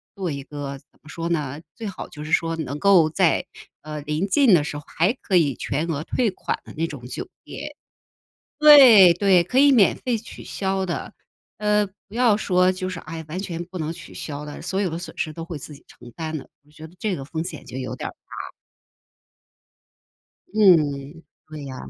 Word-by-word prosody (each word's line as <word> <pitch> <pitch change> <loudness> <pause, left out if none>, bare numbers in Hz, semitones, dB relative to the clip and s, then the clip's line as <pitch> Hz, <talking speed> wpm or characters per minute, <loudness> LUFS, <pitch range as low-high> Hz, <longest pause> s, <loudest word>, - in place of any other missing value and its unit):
做 185 -5 -3
一 140 -1 -5
个 145 -1 -6
怎 - - -32
么 155 - -16
说 165 +1 -4
呢， 150 -3 -2 0.2
最 225 - -6
好 195 - -7
就 150 0 -9
是 155 - -7
说 165 0 +1
能 150 -2 -4
够 185 -6 +5
在， 175 +1 +2 0.4
呃， 150 -1 -6
临 150 +6 -2
近 245 0 +4
的 155 - +3
时 145 0 -5
候 145 - -9
还 175 +8 +1
可 195 - -1
以 150 -6 +4
全 150 +8 -2
额 155 -2 -2
退 230 +1 0
款 - - -4
的 - - -12
那 165 +1 0
种 135 -6 -9
酒 - - -6 0.2
店。 - - -8 0.8
对 260 - +9
对， 185 -1 +4
可 250 +9 0
以 285 0 +7
免 220 -7 +5
费 240 -3 -1
取 225 - -11
消 190 -1 -2
的。 175 - -4 0.5
呃， 210 0 +2 0.2
不 200 - -14
要 240 -4 +4
说 185 -3 +2
就 185 0 -4
是， 175 - -6
哎， 160 0 -8
完 165 +4 -4
全 175 -3 -4
不 180 +1 -8
能 160 0 -3
取 - - -12
消 145 -1 -6
的， 150 -1 -8
所 195 - -2
有 190 -4 0
的 165 - -4
损 180 - -9
失 155 - -2
都 165 +1 -7
会 170 -2 -7
自 145 - -9
己 140 - -17
承 120 -1 -15
担 160 -1 -4
的， 135 - -9 0.2
我 150 - -24
觉 155 +1 -13
得 170 - -20
这 210 -1 -1
个 135 - -7
风 160 +3 -4
险 185 - -7
就 130 - -9
有 130 - -4
点 - - -4
儿 - - -10
大。 - - -10 2.0
嗯， 160 -6 +3 0.3
对 150 -3 -8
啊， 130 - -7
165 Hz, 225 characters per minute, -23 LUFS, 150-195 Hz, 2.0 s, 对